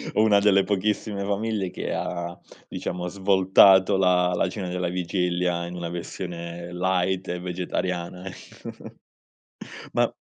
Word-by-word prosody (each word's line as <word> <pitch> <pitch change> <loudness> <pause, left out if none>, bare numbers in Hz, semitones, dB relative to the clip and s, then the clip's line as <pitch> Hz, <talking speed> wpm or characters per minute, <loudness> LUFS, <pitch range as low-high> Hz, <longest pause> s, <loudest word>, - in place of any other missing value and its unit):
o - - +4
una 105 -2 +5
delle 100 -1 +4
pochissime 105 0 -1
famiglie 100 -1 -1
che - - -4
ha, 85 0 -4 0.3
diciamo, 90 0 -4
svoltato 95 0 +5
la 90 -1 +3
la 95 - +1
cena 95 -2 -5
della 90 0 -2
vigilia 90 -1 -1
in 90 +1 -7
una 85 -1 -4
versione 85 0 -6
light 95 +1 0
e 90 0 -2
vegetariana 90 0 -3
ecco. - - -10 1.0
Ma - - +2
90 Hz, 130 wpm, -25 LUFS, 90-95 Hz, 1.0 s, una